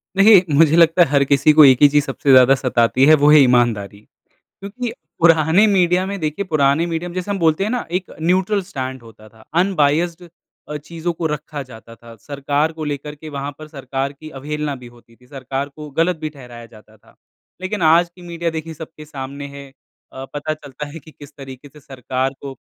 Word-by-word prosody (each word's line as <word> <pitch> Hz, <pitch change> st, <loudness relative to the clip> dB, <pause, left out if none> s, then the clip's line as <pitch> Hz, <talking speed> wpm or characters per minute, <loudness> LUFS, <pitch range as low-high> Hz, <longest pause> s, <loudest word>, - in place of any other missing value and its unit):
देखिए। 195 Hz, -1 st, +6 dB
मुझे 160 Hz, +1 st, +4 dB
लगता 165 Hz, +1 st, +4 dB
है 170 Hz, -, +5 dB
हर 140 Hz, -1 st, +3 dB
किसी 140 Hz, +2 st, +3 dB
को 155 Hz, -1 st, +8 dB
एक 130 Hz, -1 st, +5 dB
ही 145 Hz, -, +9 dB
चीज़ 145 Hz, 0 st, +2 dB
सबसे 135 Hz, 0 st, -1 dB
ज़्यादा 130 Hz, +1 st, +6 dB
सताती 130 Hz, 0 st, +1 dB
है। 155 Hz, +2 st, +7 dB
वो 150 Hz, -, +6 dB
है 155 Hz, -, +8 dB
ईमानदारी 120 Hz, -6 st, +2 dB, 0.4 s
क्योंकि 225 Hz, +5 st, -8 dB, 0.3 s
पुराने 165 Hz, +3 st, +4 dB
मीडिया 185 Hz, -2 st, +2 dB
में 200 Hz, +1 st, -5 dB
देखिए 155 Hz, +5 st, -3 dB
पुराने 155 Hz, -1 st, +1 dB
मीडिया 170 Hz, +1 st, -4 dB
में 175 Hz, -, -11 dB
जैसे 185 Hz, +2 st, -4 dB
हम 200 Hz, -, -3 dB
बोलते 160 Hz, +2 st, +2 dB
हैं 210 Hz, -, -2 dB
ना 250 Hz, -1 st, -3 dB
एक 180 Hz, +1 st, -3 dB
न्यूट्रल 185 Hz, +4 st, +1 dB
स्टैंड 130 Hz, -9 st, -6 dB
होता 110 Hz, -1 st, -16 dB
था। 110 Hz, 0 st, -20 dB, 0.2 s
अनबायस्ड 175 Hz, -1 st, 0 dB, 0.4 s
अ, 150 Hz, -, -5 dB
चीज़ों 165 Hz, +3 st, -5 dB
को 165 Hz, 0 st, -5 dB
रखा 150 Hz, -1 st, -6 dB
जाता 115 Hz, -2 st, -14 dB
था। 115 Hz, 0 st, -15 dB
सरकार 145 Hz, +5 st, -2 dB
को 160 Hz, -1 st, -7 dB
लेकर 150 Hz, 0 st, -5 dB
के 155 Hz, +1 st, -11 dB
वहाँ 140 Hz, 0 st, -5 dB
पर 155 Hz, -, -10 dB
सरकार 135 Hz, -2 st, -5 dB
की 155 Hz, +2 st, -12 dB
अवहेलना 150 Hz, +1 st, -5 dB
भी 125 Hz, -2 st, -12 dB
होती 120 Hz, -1 st, -20 dB
थी। 125 Hz, -, -24 dB
सरकार 135 Hz, +1 st, -5 dB
को 150 Hz, +1 st, -11 dB
गलत 165 Hz, +2 st, +2 dB
भी 155 Hz, 0 st, -5 dB
ठहराया 125 Hz, -5 st, -12 dB
जाता 110 Hz, -1 st, -19 dB
था। -, -, -25 dB, 0.5 s
लेकिन 185 Hz, +1 st, -4 dB
आज 170 Hz, +2 st, +4 dB
की 180 Hz, -, -16 dB
मीडिया 170 Hz, 0 st, -3 dB
देखिये 160 Hz, 0 st, -6 dB
सबके 155 Hz, 0 st, -11 dB
सामने 140 Hz, -1 st, -8 dB
है। 140 Hz, 0 st, -11 dB, 0.5 s
अ, 130 Hz, 0 st, -8 dB
पता 150 Hz, +1 st, -3 dB
चलता 150 Hz, -1 st, -9 dB
है 155 Hz, +3 st, -10 dB
कि 155 Hz, -, -17 dB
किस 145 Hz, -1 st, -15 dB
तरीक़े 135 Hz, 0 st, -11 dB
से 150 Hz, -, -17 dB
सरकार 130 Hz, -1 st, -4 dB
को 135 Hz, -1 st, -8 dB
150 Hz, 210 wpm, -19 LUFS, 135-165 Hz, 0.5 s, ही